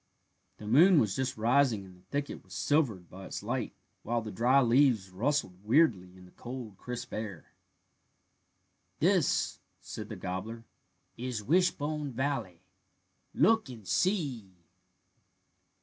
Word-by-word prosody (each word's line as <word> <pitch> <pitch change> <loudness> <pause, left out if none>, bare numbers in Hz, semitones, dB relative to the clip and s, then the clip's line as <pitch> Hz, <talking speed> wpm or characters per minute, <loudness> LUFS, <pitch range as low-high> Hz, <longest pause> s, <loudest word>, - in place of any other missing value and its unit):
The 105 - -10
moon 160 - +6
was 105 -6 +1
just 130 -2 -2
rising 115 -2 +2
and 95 -1 -14
the 90 +1 -23
thicket 145 0 -3
was 95 0 -12
silvered 120 - +1
by 95 +2 -10
its - - -6
light, - - -3 0.3
while 120 +1 -1
the 110 - -6
dry 125 +7 +4
leaves 120 -6 +3
rustled 100 -3 -1
weirdly 105 - +2
in 90 - -14
the 90 - -17
cold 120 -4 -8
crisp 125 -1 -6
air. 105 -7 -6 1.4
"This," - - +2 0.2
said - - -8
the - - -5
gobbler, 110 +6 -5 0.5
"is 120 -3 -4
Wishbone 150 - +1
Valley. 120 -10 -3 0.7
Look 225 -9 +3
and 110 -6 -10
see." 140 - 0
120 Hz, 130 wpm, -30 LUFS, 95-140 Hz, 1.4 s, moon